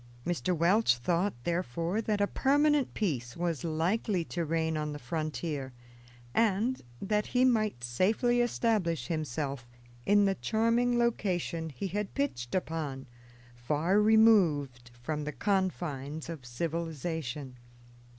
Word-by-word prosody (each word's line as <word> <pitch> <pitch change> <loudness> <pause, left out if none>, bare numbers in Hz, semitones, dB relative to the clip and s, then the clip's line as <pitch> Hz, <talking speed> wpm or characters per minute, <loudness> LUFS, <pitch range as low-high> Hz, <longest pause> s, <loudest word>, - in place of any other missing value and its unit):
Mr. 175 0 0
Welch 175 - +4
thought, 175 +10 0
therefore, 170 - -1
that 215 -2 -1
a - - +5
permanent 290 +4 +2
peace 130 - -2
was 170 -4 -2
likely 175 +3 0
to 170 +1 -3
reign 160 0 0
on 150 -1 -2
the - - -5
frontier, 150 -1 -4 0.6
and 225 - +1 0.2
that 210 +4 0
he 250 +1 +3
might 215 - +1
safely 215 - +2
establish 205 - 0
himself 140 -5 -3 0.4
in 205 +4 +4
the 195 - +3
charming 230 +4 +1
location 180 -8 0
he 140 +6 -6
had 200 +2 -3
pitched 190 - -2
upon, 155 -7 -3 0.5
far 150 +11 +1
removed 175 - +4
from 150 +3 -2
the 150 - -3
confines 160 - -2
of 150 -6 -7
civilization. 155 -2 -4
170 Hz, 120 wpm, -30 LUFS, 150-210 Hz, 0.6 s, a